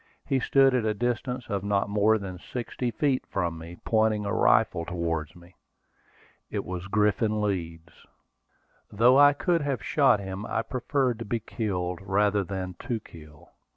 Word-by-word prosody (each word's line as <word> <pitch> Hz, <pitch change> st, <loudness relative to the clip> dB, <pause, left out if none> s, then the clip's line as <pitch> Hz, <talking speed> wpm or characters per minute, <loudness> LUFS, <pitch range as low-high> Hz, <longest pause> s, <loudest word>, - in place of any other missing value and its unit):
He 135 Hz, -, +1 dB
stood 135 Hz, +1 st, +4 dB
at 125 Hz, -3 st, +1 dB
a 110 Hz, -1 st, 0 dB
distance 125 Hz, +2 st, -2 dB
of 100 Hz, -3 st, -2 dB
not 100 Hz, -1 st, +1 dB
more 105 Hz, +2 st, +3 dB
than 95 Hz, -3 st, -7 dB
sixty 120 Hz, +3 st, -4 dB
feet 135 Hz, +1 st, 0 dB
from 85 Hz, -3 st, -2 dB
me, 85 Hz, +2 st, -10 dB
pointing 110 Hz, -2 st, +2 dB
a 100 Hz, -, -2 dB
rifle 110 Hz, -9 st, +3 dB
towards 85 Hz, -3 st, -3 dB
me. 85 Hz, +1 st, -17 dB, 1.0 s
It -, -, -3 dB
was 90 Hz, 0 st, -5 dB
Griffin 105 Hz, +1 st, +1 dB
Leeds. 85 Hz, -5 st, -4 dB, 0.8 s
Though 120 Hz, +6 st, +5 dB
I 145 Hz, 0 st, +7 dB
could 165 Hz, +4 st, 0 dB
have 135 Hz, -8 st, -2 dB
shot -, -, +3 dB
him, 95 Hz, 0 st, -6 dB
I 115 Hz, -, -1 dB
preferred 125 Hz, 0 st, -1 dB
to 115 Hz, -, -5 dB
be 115 Hz, +2 st, -1 dB
killed 90 Hz, -6 st, -3 dB
rather 100 Hz, +1 st, +1 dB
than 95 Hz, -1 st, -5 dB
to 120 Hz, -2 st, -1 dB
kill. 75 Hz, -6 st, -15 dB
105 Hz, 160 wpm, -27 LUFS, 90-120 Hz, 1.0 s, I